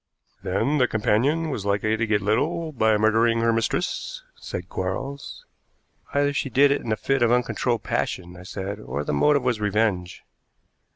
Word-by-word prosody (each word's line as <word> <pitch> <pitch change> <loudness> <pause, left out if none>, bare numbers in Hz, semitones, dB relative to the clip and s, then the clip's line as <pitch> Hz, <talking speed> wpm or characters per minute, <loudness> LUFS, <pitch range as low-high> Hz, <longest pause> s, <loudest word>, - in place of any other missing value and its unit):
"Then 110 +10 0
the 125 - +4
companion 135 +10 +1
was 105 - -3
likely 100 +2 +1
to 115 0 -1
get 105 -2 +1
little 155 - 0
by 110 -6 +2
murdering 115 +2 +3
her 115 0 +3
mistress," 115 0 -2
said 90 0 -7
Quarles. 135 +12 -5 0.7
"Either 145 0 +1
she 140 - -1
did 140 +3 +4
it 140 - +1
in 115 - -4
a - - +3
fit 135 +3 0
of 120 -1 +4
uncontrollable 120 -1 0
passion," 90 -1 -2
I 90 - -11
said, 95 +2 -5
"or 75 -8 -4
the 75 - -2
motive 140 - +3
was 125 -3 0
revenge." 105 -4 0
115 Hz, 170 wpm, -24 LUFS, 100-135 Hz, 0.7 s, the